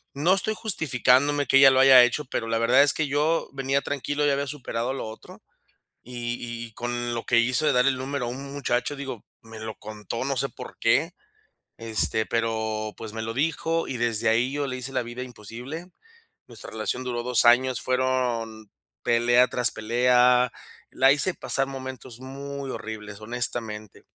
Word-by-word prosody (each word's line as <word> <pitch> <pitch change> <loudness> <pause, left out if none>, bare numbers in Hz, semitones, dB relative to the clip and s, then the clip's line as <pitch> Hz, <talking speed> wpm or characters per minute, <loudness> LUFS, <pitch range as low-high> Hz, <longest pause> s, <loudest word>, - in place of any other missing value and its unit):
No 165 +6 +3
estoy 215 +3 0
justificándome 145 - +2
que 135 - +5
ella 135 -1 +9
lo 130 - +3
haya 130 -2 +9
hecho, 135 +5 0
pero 115 -2 -3
la 115 0 0
verdad 125 +4 +5
es 145 - +4
que 155 - 0
yo 150 +4 +1
venía 135 +1 0
tranquilo, 145 +2 -2
ya 145 - +3
había 140 +1 -1
superado 125 -3 -3
lo 135 - -5
otro. 110 - -12 0.6
Y 120 -1 -4 0.3
y 115 - -16
con 120 0 -3
lo 115 - -4
que 120 - +3
hizo 130 +6 +1
de 150 - +4
dar 125 0 +3
el 135 -1 +2
número 130 -1 -3
a - - -3
u - - -4
un 140 +2 -8
muchacho, 130 0 -1
digo, 135 -6 -7 0.2
me 110 -1 -11
lo 110 -1 -6
contó, 110 +3 -6
no 135 0 -1
sé, 135 +2 0
¿por - - -11
qué?, 160 +9 +2 0.7
este, 110 -1 0
pero, 110 -2 -2
pues, 110 -1 -8
me 110 0 -4
lo 115 - -4
dijo 165 +4 -1
y 125 - -4
desde 115 -1 +1
ahí 120 +4 +2
yo 145 -1 -2
le 130 0 -4
hice 130 +2 -6
la 130 - +1
vida 120 +2 -6
imposible. 125 - -8 0.6
Nuestra 115 -4 -11
relación 110 +4 -3
duró 120 -1 -3
2 125 0 +2
años, 125 +1 +4
fueron 125 -4 -1 0.3
pelea 120 +2 +4
tras 125 -4 +1
pelea. 125 +2 +3 0.4
La 135 +1 +5
hice 175 +5 0
pasar 130 +1 -1
momentos 130 -2 -8
muy 140 +1 -7
horribles, 110 -3 -7
honestamente. 110 -2 -4
125 Hz, 185 wpm, -25 LUFS, 115-135 Hz, 0.7 s, ella